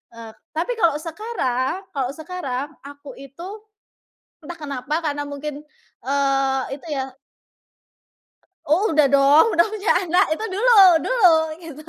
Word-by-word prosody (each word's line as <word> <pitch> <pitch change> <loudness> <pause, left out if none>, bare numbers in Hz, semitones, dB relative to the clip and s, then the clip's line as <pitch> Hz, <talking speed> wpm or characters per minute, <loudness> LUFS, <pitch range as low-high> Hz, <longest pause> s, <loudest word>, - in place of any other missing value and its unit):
Eee 230 -1 -10 0.2
tapi 405 +9 -2
kalau 335 -7 +3
sekarang 325 - -3
kalau 265 -3 -2
sekarang, 300 -5 -5 0.2
aku 285 -1 -12
itu, 275 +4 -12 1.0
entah 345 +2 -9
kenapa 280 -2 -5
karena 290 -2 -3
mungkin, 290 +1 -7 0.4
eee, 275 -1 +1 0.2
itu - - -17
ya 265 -1 -4 1.6
Oh 335 +6 +1
udah 300 -3 +4
dong, 280 +4 +5
udah 340 - +5
punya 420 -1 -3 0.2
anak. 360 +3 +3
Itu 435 +8 -5
dulu 450 +4 +2 0.2
dulu, 430 -9 +4 0.3
gitu. 310 -3 -10
295 Hz, 125 wpm, -21 LUFS, 275-350 Hz, 1.6 s, dong